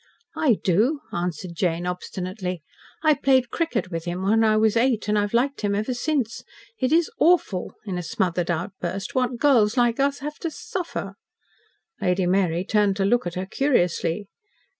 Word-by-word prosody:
"I 260 -8 +3
do," 230 - +2
answered 175 0 -3
Jane 170 0 -1
obstinately. 180 0 -4 0.4
"I 310 -1 +6
played 260 -4 +2
cricket 255 - -1
with 165 0 -4
him 175 +2 -3
when 220 +3 +3
I 215 -1 +4
was 220 0 +3
eight, 230 -3 +2
and 210 - +2
I've 205 -1 +1
liked 270 +4 +1
him 205 -1 0
ever 215 +5 -1
since. 250 -2 -1 0.4
It 260 +1 +1
is 330 +1 +3
AWFUL," 315 - +2
in 185 -4 -3
a - - -2
smothered 175 0 -1
outburst, 180 +2 -3
"what 250 -1 0
girls 235 -4 +3
like 240 0 +2
us 280 +1 +2
have 295 +1 -6
to 335 - -2
suffer." 355 - -5 0.9
Lady 180 0 +1
Mary 180 -1 +1
turned 205 -2 +2
to 195 -1 0
look 240 -1 +2
at 175 - -5
her 185 +1 -3
curiously. 190 - 0
210 Hz, 170 wpm, -24 LUFS, 180-260 Hz, 0.9 s, I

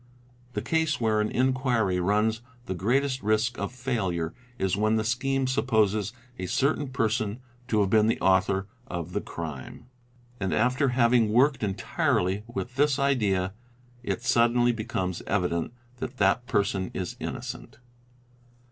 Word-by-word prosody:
'The - - -3
case 160 -3 +1
where 110 -2 +2
an 105 - 0
inquiry 125 -7 +1
runs 105 +4 +1 0.2
the 95 - -3
greatest 130 +8 0
risk 110 +3 +1
of - - -2
failure 100 -11 -2 0.2
is 95 -1 0
when 110 +2 +2
the 110 - +1
scheme 135 +4 0
supposes 110 -5 +1 0.3
a 90 - -3
certain 140 - +1
person 110 -4 -1 0.3
to 110 -4 +2
have 95 -2 +1
been 110 -1 +5
the 115 - +1
author 95 +1 +2 0.2
of 85 0 -5
the - - -1
crime; 80 - -7 0.5
and 95 -1 -1
after 125 +5 +2
having 120 -2 +3
worked 135 +5 +3
entirely 95 -1 0
with 120 +1 -5
this 145 -1 +3
idea, 105 -10 +1 0.5
it - - -3
suddenly 120 +1 +3
becomes 95 -6 -3
evident 90 -3 0 0.3
that 125 +1 -6
that 105 +4 +2
person 100 -5 0
is 90 -2 -3
innocent. - - -6
110 Hz, 140 wpm, -27 LUFS, 95-125 Hz, 0.5 s, been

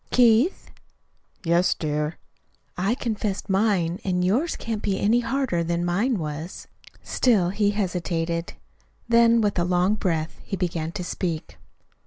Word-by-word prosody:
"Keith." 245 - +3 0.7
"Yes, 170 +1 +3
dear." 150 0 -2 0.6
"I 195 +6 0
confessed 210 -4 -3
mine, 190 -3 +1
and 180 -1 0
yours 255 - +1
can't 225 -2 -4
be 195 -2 -1
any 225 +4 +3
harder 235 -7 0
than 170 +1 -1
mine 205 +8 +1
was." 155 +1 -6 0.4
Still 210 -9 +2
he 205 +2 +1
hesitated; 175 -4 -2 0.5
then, 235 0 +5
with 205 -3 +1
a - - +2
long 180 +3 +2
breath 165 -6 -2
he - - -4
began 165 -3 -2
to 180 - -4
speak. 170 -3 -4
185 Hz, 135 wpm, -24 LUFS, 170-220 Hz, 0.7 s, then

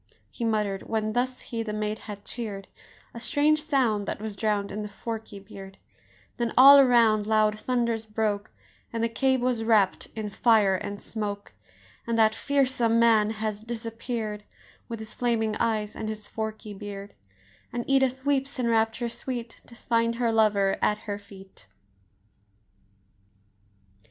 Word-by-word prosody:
He 235 - -6
mutter'd, 210 -3 -1
when 215 -1 -1
thus 250 +2 -1
he 230 -1 -4
the 215 -2 -4
maid 215 0 -2
had 205 -1 -9
cheer'd, 205 -5 -6 0.5
A 235 - -7
strange 300 +4 +2
sound 250 -9 +1
that - - -3
was 215 -1 -5
drown'd 205 -1 -1
in 210 - -4
the 210 - -5
forky 220 0 -6
beard; 195 -1 -11 0.6
Then 235 -2 -2
all 280 +2 +10
around 230 -5 +4
loud 215 -1 +2
thunders 235 -2 -1
broke, 210 -1 -1 0.4
And 230 -1 -2
the - - +3
cave 260 +2 +1
was 245 -3 0
wrapp'd 215 -4 +2
in 215 -2 -4
fire 215 -3 +4
and 200 +2 -4
smoke, 205 - -5 0.5
And 230 -1 0
that 220 -1 +5
fearsome 250 -3 +1
man 225 -2 +5
has 215 -1 -3
disappear'd 225 -2 -5 0.5
With 230 - -4
his 220 0 -9
flaming 225 -3 0
eyes 215 -2 -1
and 215 - -4
his 215 -1 -6
forky 220 -1 -5
beard; 200 0 -8 0.6
And 240 0 -4
Edith 265 -1 +2
weeps 280 -1 0
in 250 -2 0
rapture 225 +1 +1
sweet 235 0 -6
To 235 - -14
find 230 0 0
her 235 -1 +1
lover 210 -3 +2
at 210 - +2
her 205 -1 -4
feet! 195 -1 -15
220 Hz, 150 wpm, -26 LUFS, 210-235 Hz, 0.6 s, all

